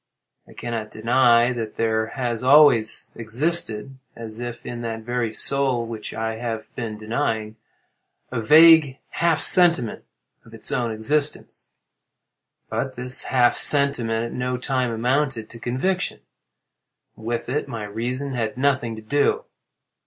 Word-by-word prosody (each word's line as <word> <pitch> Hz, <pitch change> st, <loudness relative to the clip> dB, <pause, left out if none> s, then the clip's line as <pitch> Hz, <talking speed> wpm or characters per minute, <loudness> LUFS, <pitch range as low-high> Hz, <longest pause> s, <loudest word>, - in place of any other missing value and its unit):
I -, -, -16 dB
cannot 115 Hz, -2 st, -5 dB
deny 120 Hz, +2 st, +3 dB
that 115 Hz, -3 st, -6 dB
there 110 Hz, -1 st, 0 dB
has 120 Hz, -1 st, -4 dB
always 130 Hz, -5 st, +4 dB
existed, 125 Hz, 0 st, -1 dB, 0.2 s
as 115 Hz, -1 st, -9 dB
if 120 Hz, 0 st, -7 dB
in 120 Hz, 0 st, -6 dB
that 115 Hz, -1 st, -5 dB
very 120 Hz, 0 st, -3 dB
soul 130 Hz, 0 st, +1 dB
which 115 Hz, -2 st, -7 dB
I 110 Hz, 0 st, -4 dB
have 115 Hz, -2 st, -6 dB
been 110 Hz, -3 st, -5 dB
denying, 110 Hz, 0 st, -3 dB, 0.7 s
a 120 Hz, -3 st, -3 dB
vague 155 Hz, +1 st, +6 dB
half 165 Hz, -2 st, 0 dB
sentiment 170 Hz, -11 st, +4 dB, 0.4 s
of -, -, -15 dB
its -, -, -4 dB
own 120 Hz, -2 st, -1 dB
existence. 140 Hz, +7 st, -3 dB, 1.0 s
But 130 Hz, -1 st, -4 dB
this 125 Hz, +1 st, +2 dB
half 125 Hz, -2 st, +3 dB
sentiment 120 Hz, -6 st, +2 dB
at 115 Hz, -, -7 dB
no 125 Hz, 0 st, -3 dB
time 130 Hz, -1 st, -2 dB
amounted 125 Hz, 0 st, -1 dB
to 115 Hz, -, -12 dB
conviction. 155 Hz, +11 st, -2 dB, 0.9 s
With 115 Hz, +1 st, -5 dB
it 140 Hz, +4 st, -2 dB
my 115 Hz, -2 st, -6 dB
reason 120 Hz, +7 st, -4 dB
had 115 Hz, 0 st, -3 dB
nothing 130 Hz, -4 st, 0 dB
to 110 Hz, -, -11 dB
do. 145 Hz, -, 0 dB
120 Hz, 135 wpm, -22 LUFS, 115-135 Hz, 1.0 s, vague